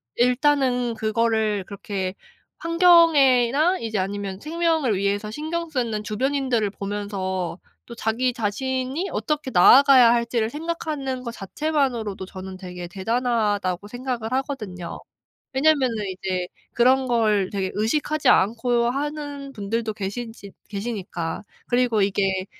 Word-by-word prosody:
일단은 250 -1 +2
그거를 220 -2 0
그렇게 195 -2 -4 0.4
환경에나 330 -3 +4
이제 220 -3 -2
아니면 195 0 -3
생명을 320 -4 0
위해서 200 +2 -1
신경 325 +6 -4
쓰는 235 -7 -2
주변인들을 250 0 0
보면서 195 -3 -4 0.3
또 235 - -10
자기 235 +3 0
자신이 260 - -2
어떻게 300 -2 -2
나아가야 255 +5 +7
할지를 235 -1 +1
생각하는 295 -3 -4
거 235 - -4
자체만으로도 235 -3 -2
저는 185 0 -9
되게 180 -2 -8
'대단하다.'고 205 -2 -1
생각을 245 -1 -4
하거든요. 215 -10 -4 0.5
왜냐하면은 270 -3 +2 0.2
이제 185 -1 -3 0.3
그런 260 +2 +3
걸 215 -5 +2
되게 190 -2 -2
의식하지 285 +6 +1
않고 235 +3 +3
하는 290 0 -4
분들도 220 0 -3
계시지 205 +1 -6 0.2
계시니까. 200 -6 -4 0.2
그리고 245 -3 +2
이게 195 -1 0
235 Hz, 305 characters per minute, -23 LUFS, 205-270 Hz, 0.5 s, 나아가야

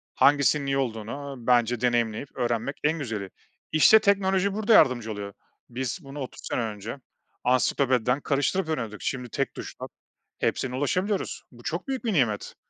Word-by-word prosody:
Hangisinin 140 0 +4
iyi 135 0 0
olduğunu 135 +3 -3
bence 120 -1 +3
deneyimleyip 120 +1 0
öğrenmek 120 +2 -1
en 155 +2 +1
güzeli. 110 -8 -4 0.4
İşte 155 +8 +7
teknoloji 195 -1 +2
burada 215 +2 +2
yardımcı 120 - +5
oluyor. 100 -1 -6 0.4
Biz 130 +7 -3
bunu 140 +1 -8
30 130 -3 -7
sene - - 0
önce 110 +2 -5 0.5
ansiklopediden 125 0 +2
karıştırıp 155 +5 0
öğreniyorduk. 115 -9 -3
Şimdi 125 -3 -3
tek 140 +3 -2
tuşla - - -7 0.5
hepsine 125 -1 -1
ulaşabiliyoruz. 185 +9 -1
Bu 120 -1 -16
çok 170 - -3
büyük 265 -2 -3
bir 220 - +1
nimet. 120 - 0
130 Hz, 145 wpm, -26 LUFS, 120-155 Hz, 0.5 s, İşte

